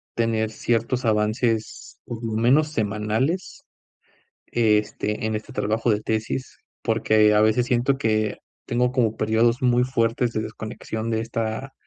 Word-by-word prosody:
tener 115 -1 0
ciertos 120 +2 -1
avances, 110 +1 -1
por 120 0 -7
lo 110 -1 -3
menos 130 +7 +3
semanales, 110 - -1 0.8
este, 105 -1 0
en 110 0 -1
este 110 +5 -6
trabajo 110 +1 0
de 105 0 0
tesis, 110 +4 -3 0.2
porque 110 -2 +3
a 105 - +4
veces 110 +3 +3
siento 125 +2 +2
que, 110 -4 0 0.3
tengo 125 +1 +1
como 115 -4 +1
períodos 115 +3 +2
muy 125 -1 +3
fuertes 120 -1 0
de 110 - -1
desconexión 110 +1 -5
de 110 - 0
esta 115 +3 -3
115 Hz, 135 wpm, -23 LUFS, 110-120 Hz, 0.8 s, a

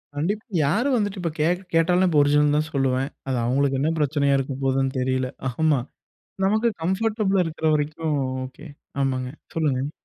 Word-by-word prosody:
கண்டிப்பா. 205 - -2 0.2
யாரும் 245 - +2
வந்துட்டு 205 -3 -1
இப்போ 165 -2 -1
கேக் 175 +4 +1
கேட்டாலும், 175 +2 +3
நான் 185 - +3
இப்ப 150 -3 +3
ஒரிஜினல்ன்னு 145 0 +3
தான் 155 +1 -1
சொல்லுவேன். 135 0 +1 0.2
அது 130 -2 0
அவங்களுக்கு 135 +2 +1
என்ன 150 +3 +1
பிரச்சனையா 140 -1 +2
இருக்க 135 0 -2
போகுதுன்னு 135 0 +1
தெரியல 130 0 0 0.2
ஆமா. 155 -3 +2 0.7
நமக்கு 215 +4 +2 0.2
கம்ஃபர்டபிளா 195 +1 +1
இருக்கற 160 0 -4
வரைக்கும் 150 0 -1 0.3
ஓகே 145 +5 -13 0.3
ஆமாங்க, 130 -2 -1 0.3
சொல்லுங்க. 145 -3 0
150 Hz, 155 wpm, -24 LUFS, 135-180 Hz, 0.7 s, கேட்டாலும்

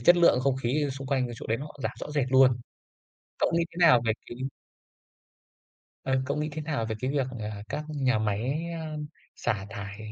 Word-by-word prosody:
chất 175 +9 +7
lượng 170 -7 +6
không 130 0 +2
khí, 130 +4 0
ở, - - -2
xung 135 0 -6
quanh 130 -2 +1
cái 120 - -6
chỗ - - -7
đấy 115 - +1
nó 150 +2 -6
giảm - - -1
rõ - - -4
rệt 145 -3 +1
luôn. 130 -2 +6 0.8
Cậu - - +2
nghĩ 170 0 +3
thế - - -16
nào 125 -7 +7
về 110 - +3
cái 120 - -8 1.7
Ờ, 130 0 +1
cậu 140 +2 -1
nghĩ 150 +1 -1
thế 155 +1 -4
nào 145 -7 -1
về 110 - -2
cái 130 - 0
việc, 140 -2 +1
à, 105 -1 -5
các 150 - -3
nhà 130 -6 +1
máy, 115 +9 0 0.2
ơm, 155 -2 -4 0.3
xả 100 -2 -1
thải 100 0 -6
130 Hz, 215 wpm, -28 LUFS, 120-150 Hz, 1.7 s, chất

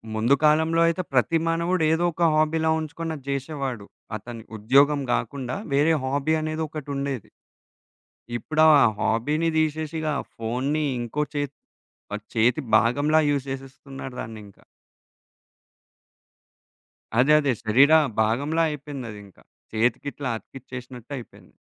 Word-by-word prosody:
ముందు 115 +5 +3
కాలంలో 160 +2 +4
అయితే, 170 +2 0
ప్రతి 135 +6 +3
మానవుడు 170 +1 +1
ఏదో 165 +2 +1
ఒక 170 - -1
హాబీలా 155 +1 +2
ఉంచుకొని 160 +1 -4
అది 140 - -11
జేషేవాడు. 135 -5 -3 0.3
అతని 115 0 -9
ఉద్యోగం 140 +7 +4
గాకుండా, 130 -3 -2 0.2
వేరే 150 +4 +4
హాబీ 140 +4 +1
అనేదొకటుండేది. 145 - -4 1.1
ఇప్పుడా 155 +6 +2 0.3
హాబీని 145 +10 +1
దీషేషిగా 155 0 -1 0.2
ఫోన్ని 130 +7 -1 0.2
ఇంకో 120 +6 -2
చేత్ 145 -1 -2 0.6
ప - - -2 0.2
చేతి 120 +6 +3 0.2
భాగంలా 145 +8 +3
యూజ్ 140 -2 0
జేసేస్తున్నారు 135 -1 -8
దాన్నింక. 105 -3 -10 2.6
అదే, 140 +4 +5
అదే. 145 -3 +1
శరీర 130 +7 +5 0.3
భాగంలా 140 +9 +1
అయిపోయిందదింక. 125 -9 -8 0.4
చేతికిట్లా 125 +4 -1
అతికిచ్చేసినట్టయిపోయింది. 125 0 -10
140 Hz, 100 wpm, -24 LUFS, 125-155 Hz, 2.6 s, అదే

